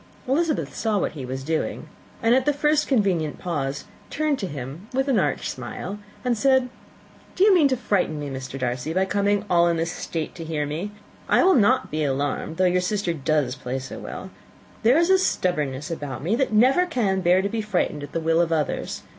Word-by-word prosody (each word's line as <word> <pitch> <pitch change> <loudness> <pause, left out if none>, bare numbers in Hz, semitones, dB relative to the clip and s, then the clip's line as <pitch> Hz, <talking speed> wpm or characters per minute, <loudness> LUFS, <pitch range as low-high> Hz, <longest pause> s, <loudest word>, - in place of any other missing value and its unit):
Elizabeth 305 +3 0
saw 220 -2 0
what - - 0
he 135 -5 -7
was 130 +1 -4
doing, 160 +2 -2 0.4
and 225 +1 +4
at 260 +2 +2
the 295 - +4
first 300 +1 +2
convenient 190 - +1
pause 140 -5 -3 0.2
turned 305 -2 0
to 195 - -2
him 145 - -7
with 265 +1 +1
an 255 -7 +3
arch 145 -6 0
smile, 130 - -6 0.3
and 245 -1 +2
said, 260 +1 +3 0.7
"You 395 +2 +6
mean 330 -6 +5
to 260 -2 0
frighten 185 -9 0
me, 145 - -4
Mr. 130 0 -6
Darcy, 125 +4 -2
by 190 +2 +2
coming 200 +1 +1
in - - -13
all 170 -2 +4
this 165 0 -1
state 165 -2 -4
to 165 - -8
hear 155 -2 -2
me. 160 +8 -4 0.4
But - - -1
I - - +5
will 380 - +6
not 255 +2 +3
be 155 +1 -1
alarmed, 145 +3 -2
though 185 - +3
your 180 0 +3
sister 180 -1 -1
does 150 -3 0
play 130 0 -4
so 135 0 -7
well. - - -7 0.5
There 235 +6 +5
is 340 +3 +3
a 380 - +6
stubbornness 150 - -1
about 145 -5 -5
me 190 +8 +1
that 265 0 0
never 260 +12 +4
can 205 - 0
bear 180 +1 +4
to - - +1
be 225 +1 -2
frightened 185 -7 -1
at 145 0 -8
the - - -1
will 165 +1 +2
of 170 -1 0
others. 155 -3 -2
180 Hz, 215 wpm, -24 LUFS, 150-240 Hz, 0.7 s, You